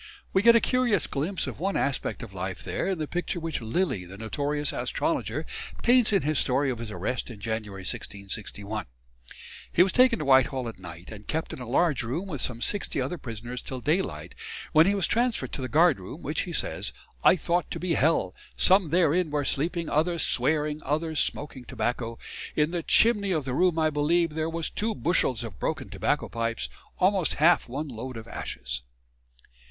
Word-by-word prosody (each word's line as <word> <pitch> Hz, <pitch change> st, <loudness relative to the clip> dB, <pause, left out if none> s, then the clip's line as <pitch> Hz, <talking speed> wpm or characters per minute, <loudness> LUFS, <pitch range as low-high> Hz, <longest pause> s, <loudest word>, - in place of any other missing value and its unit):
We 190 Hz, -, +4 dB
get 235 Hz, +2 st, +7 dB
a -, -, +7 dB
curious 240 Hz, -, +2 dB
glimpse 165 Hz, +7 st, -2 dB
of -, -, -6 dB
one 195 Hz, +3 st, 0 dB
aspect 135 Hz, -2 st, -1 dB
of 110 Hz, -4 st, -9 dB
life 95 Hz, 0 st, -4 dB
there -, -, -2 dB
in 190 Hz, -2 st, 0 dB
the 155 Hz, -1 st, -3 dB
picture 175 Hz, +1 st, -2 dB
which 165 Hz, -4 st, -3 dB
Lilly, 115 Hz, -, 0 dB
the 95 Hz, +2 st, -10 dB
notorious 145 Hz, +7 st, -1 dB
astrologer, -, -, -1 dB, 0.4 s
paints 245 Hz, -2 st, +5 dB
in 195 Hz, -3 st, +3 dB
his 155 Hz, -1 st, +1 dB
story 135 Hz, +2 st, +2 dB
of 120 Hz, -, -5 dB
his 115 Hz, -2 st, -5 dB
arrest 105 Hz, +7 st, -3 dB
in 115 Hz, -4 st, -9 dB
January 105 Hz, -2 st, -4 dB
1661. 100 Hz, +2 st, -5 dB, 0.8 s
He 175 Hz, -, +6 dB
was 190 Hz, -, +1 dB
taken 255 Hz, -2 st, +5 dB
to 150 Hz, -, -4 dB
Whitehall 130 Hz, -1 st, +4 dB
at 115 Hz, -, -7 dB
night, 85 Hz, +1 st, -10 dB
and 105 Hz, -1 st, -10 dB
kept 160 Hz, +1 st, -2 dB
in -, -, -7 dB
a 120 Hz, -, -7 dB
large 150 Hz, +1 st, +2 dB
room 135 Hz, +12 st, -3 dB
with 145 Hz, -8 st, -4 dB
some 120 Hz, -2 st, -2 dB
sixty 205 Hz, -8 st, -1 dB
other 135 Hz, +7 st, -2 dB
prisoners 120 Hz, 0 st, -6 dB
till 130 Hz, -, -5 dB
daylight, 155 Hz, +9 st, -1 dB, 0.4 s
when 160 Hz, +2 st, +6 dB
he 200 Hz, -, +3 dB
was 195 Hz, -4 st, +2 dB
transferred 240 Hz, +1 st, 0 dB
to -, -, -3 dB
the 130 Hz, -, -3 dB
guardroom, 155 Hz, -, +2 dB
which, -, -, -1 dB
he -, -, -4 dB
says, -, -, -1 dB, 0.3 s
"I -, -, +7 dB
thought 175 Hz, -1 st, 0 dB
to -, -, -4 dB
be 180 Hz, -2 st, 0 dB
hell; 145 Hz, -, +2 dB, 0.2 s
some 190 Hz, -3 st, +5 dB
therein 170 Hz, 0 st, +3 dB
were 145 Hz, -1 st, -1 dB
sleeping, 165 Hz, +5 st, 0 dB
others 165 Hz, +2 st, +1 dB
swearing, 150 Hz, +3 st, +2 dB
others 155 Hz, +2 st, 0 dB
smoaking 135 Hz, -4 st, -1 dB
tobacco. 120 Hz, -1 st, -2 dB, 0.4 s
In 150 Hz, +1 st, +2 dB
the 175 Hz, -1 st, -1 dB
chimney 205 Hz, +1 st, +3 dB
of 155 Hz, -5 st, -1 dB
the 130 Hz, -, -2 dB
room 175 Hz, +3 st, +3 dB
I 155 Hz, -1 st, +3 dB
believe 160 Hz, +3 st, +2 dB
there 160 Hz, +1 st, -1 dB
was 165 Hz, -1 st, -2 dB
two 220 Hz, +1 st, -1 dB
bushels 130 Hz, -, +1 dB
of 110 Hz, -7 st, -8 dB
broken -, -, -2 dB
tobacco -, -, 0 dB
pipes, 115 Hz, 0 st, -2 dB, 0.3 s
almost 190 Hz, -2 st, +2 dB
half 165 Hz, -2 st, +4 dB
one 145 Hz, +5 st, -3 dB
load 125 Hz, 0 st, -6 dB
of 115 Hz, 0 st, -9 dB
ashes." 60 Hz, -, -5 dB
150 Hz, 190 wpm, -27 LUFS, 120-175 Hz, 0.8 s, get